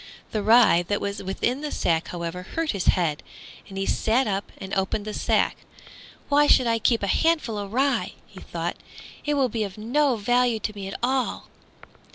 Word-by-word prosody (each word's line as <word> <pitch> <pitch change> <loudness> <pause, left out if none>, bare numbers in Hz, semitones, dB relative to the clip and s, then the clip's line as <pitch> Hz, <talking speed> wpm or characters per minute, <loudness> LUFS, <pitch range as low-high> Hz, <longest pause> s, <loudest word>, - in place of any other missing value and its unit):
The 215 - -1
rye 220 -4 +6
that 205 - 0
was 200 0 -4
within 240 +8 -2
the 300 - -3
sack, 165 -1 0
however, 170 0 -5
hurt 320 - -2
his 195 -4 -3
head, 165 -5 +2 0.5
and 195 - -8
he 195 - -1
sat 235 +7 +1
up 200 -2 -3
and 190 - -8
opened 195 +2 -1
the 215 - -5
sack. - - +1 0.7
"Why 290 +1 +4
should 255 - +5
I 230 -1 +1
keep 225 0 +2
a - - +3
handful 305 - +1
of 200 -1 -5
rye?" 270 +4 +1
he - - -14
thought, - - -4 0.5
"It 295 0 +1
will 270 -2 +3
be 225 -2 -2
of 195 -1 -6
no 255 +5 +1
value 245 +2 +2
to 215 - -3
me 200 -2 -7
at 195 - -5
all." 260 0 -1
220 Hz, 195 wpm, -25 LUFS, 195-255 Hz, 0.7 s, rye